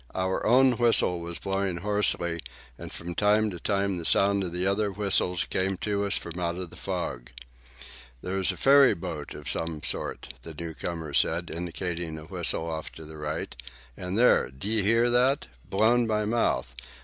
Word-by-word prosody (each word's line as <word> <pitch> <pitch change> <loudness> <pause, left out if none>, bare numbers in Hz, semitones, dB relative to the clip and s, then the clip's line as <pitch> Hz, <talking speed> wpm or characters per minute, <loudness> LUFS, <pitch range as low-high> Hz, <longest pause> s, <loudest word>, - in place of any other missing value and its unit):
Our 95 0 -1
own 125 +1 +5
whistle 115 -7 +4
was 85 0 -6
blowing 95 -2 -2
hoarsely, 90 -3 0 0.4
and - - -9
from 85 +1 -4
time 105 +2 +2
to 90 - -7
time 100 -1 0
the - - -6
sound 100 +3 +3
of 90 -2 -4
other 100 +3 0
whistles 95 -3 +1
came 95 0 -1
to 100 +1 -1
us 100 - +1
from 85 +1 -6
out 85 -1 -1
of 90 -2 -6
the - - -12
fog. 85 -10 -4 0.9
"That's 95 0 +1
a - - -9
ferry 140 0 +6
boat 85 - -6
of - - -9
some 80 -3 -2
sort," - - -3
the 80 -1 -9
new 85 +1 -6
comer 80 -3 -5
said, 85 +3 +1
indicating 85 -1 -4
a 80 - -9
whistle 85 -1 -1
off 80 -1 -5
to 80 - -10
the 80 0 -10
right. 75 0 -4 0.4
"And 90 +2 -4
there! 125 +2 +4
D'ye 100 +12 0
hear 115 +4 +3
that? 125 - +2 0.2
Blown 115 +4 +3
by 105 -1 0
mouth. 105 - 0
95 Hz, 175 wpm, -27 LUFS, 85-105 Hz, 0.9 s, ferry